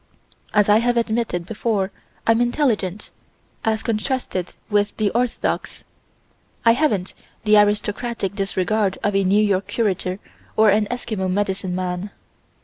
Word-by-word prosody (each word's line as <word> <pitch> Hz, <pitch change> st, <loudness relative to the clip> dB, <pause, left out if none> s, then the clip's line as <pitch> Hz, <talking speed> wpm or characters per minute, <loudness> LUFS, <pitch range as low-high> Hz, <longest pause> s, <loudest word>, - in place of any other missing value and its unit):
As 210 Hz, -2 st, +3 dB
I 210 Hz, +1 st, +6 dB
have 240 Hz, +1 st, +1 dB
admitted 225 Hz, -6 st, 0 dB
before 205 Hz, -1 st, -1 dB, 0.3 s
I'm 225 Hz, +1 st, +4 dB
intelligent, 235 Hz, -, 0 dB, 0.5 s
as 220 Hz, -1 st, 0 dB
contrasted 220 Hz, -5 st, -2 dB
with 205 Hz, -1 st, +1 dB
the 210 Hz, -2 st, +1 dB
orthodox. 240 Hz, +1 st, -1 dB, 0.8 s
I 230 Hz, -, +8 dB
haven't 230 Hz, -8 st, +1 dB, 0.3 s
the 215 Hz, -1 st, +5 dB
aristocratic 205 Hz, 0 st, 0 dB
disregard 195 Hz, 0 st, 0 dB
of 205 Hz, -1 st, +1 dB
a 195 Hz, -, +3 dB
New 200 Hz, +3 st, +4 dB
York 195 Hz, -2 st, +1 dB
curator 190 Hz, -4 st, -1 dB, 0.4 s
or 215 Hz, -1 st, +6 dB
an 210 Hz, +1 st, +2 dB
Eskimo 215 Hz, -6 st, -3 dB
medicine 190 Hz, -1 st, -1 dB
man. 180 Hz, +1 st, -3 dB
210 Hz, 130 wpm, -22 LUFS, 195-225 Hz, 0.8 s, I